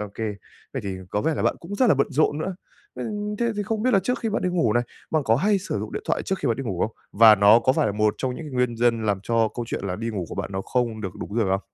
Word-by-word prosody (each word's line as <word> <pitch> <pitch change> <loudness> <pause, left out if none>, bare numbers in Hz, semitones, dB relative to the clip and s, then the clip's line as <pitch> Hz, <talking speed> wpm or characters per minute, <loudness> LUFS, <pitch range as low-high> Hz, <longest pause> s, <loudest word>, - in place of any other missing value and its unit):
Ô 105 - -4
kê, 110 - -3 0.5
vậy - - -4
thì 95 -1 -3
có 105 - 0
vẻ 160 +8 0
là - - -2
bạn - - +1
cũng 185 +5 -7
rất 250 +4 +3
là 200 - +5
bận 140 0 +2
rộn 145 +1 +2
nữa. 185 +4 -3 0.4
Nên 210 -1 -4
thế 235 -1 +1
thì 205 - 0
không 215 +1 -2
biết 255 - +3
là 195 - +5
trước 250 +6 0
khi 225 - -1
bạn 210 - -1
đi 180 - +1
ngủ 165 -12 +1
này, 120 +2 +2 0.3
bạn 155 -1 +2
có 115 +1 +3
hay 200 +6 +2
sử 185 - -3
dụng 105 +1 -5
điện - - -4
thoại - - 0
trước 190 - -2
khi - - -1
bạn 115 - +1
đi 135 - -4
ngủ 95 -8 -3
không? 110 - -1 0.2
Và 110 +1 +8
nó 100 +2 +7
có 130 +2 +2
phải 130 - +1
là 105 - 0
một 105 0 +1
trong 130 - -1
những 165 - -7
cái 150 - -8
nguyên 125 -2 +1
nhân, 115 -1 +1
làm 100 -2 +1
cho 115 0 +2
câu 120 - -3
chuyện - - -3
là 90 -2 -2
đi 115 +1 -3
ngủ 95 -5 -3
của - - -6
bạn - - -4
nó 95 - -2
không 120 -3 -1
được 95 -3 -4
đúng 100 - -6
giờ 115 - +3
không? 95 +1 +1
120 Hz, 330 wpm, -24 LUFS, -, 0.5 s, Và